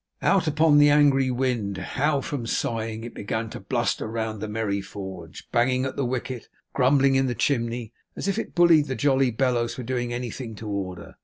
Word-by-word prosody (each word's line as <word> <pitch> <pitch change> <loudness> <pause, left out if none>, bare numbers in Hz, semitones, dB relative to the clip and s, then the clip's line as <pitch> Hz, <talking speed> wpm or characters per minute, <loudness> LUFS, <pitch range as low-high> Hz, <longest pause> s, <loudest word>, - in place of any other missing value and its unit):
Out 195 -4 +3
upon 155 0 +4
the 145 0 +7
angry 140 -3 +4
wind! 120 -6 -1
how 145 0 0
from 135 -6 -4
sighing, 115 -1 -2
it 120 - -7
began 110 +2 -3
to - - -7
bluster - - -1
round 110 -1 -3
the 110 - -3
merry 105 -2 -2
forge, 95 -5 -9
banging 130 +2 +2
at 130 - -4
the 140 - -1
wicket, 125 -1 -4
and - - -37
grumbling 135 +1 +4
in 135 0 +3
the 120 - -2
chimney, 120 -4 -1 0.2
as - - -4
if 195 - 0
it - - -6
bullied 170 -4 +5
the 130 - -2
jolly 135 +2 +3
bellows 120 -1 0
for 125 - -6
doing 120 0 -2
anything 120 -1 -5
to 110 +1 -8
order. 95 -3 -5
125 Hz, 200 wpm, -25 LUFS, 110-135 Hz, 0.2 s, the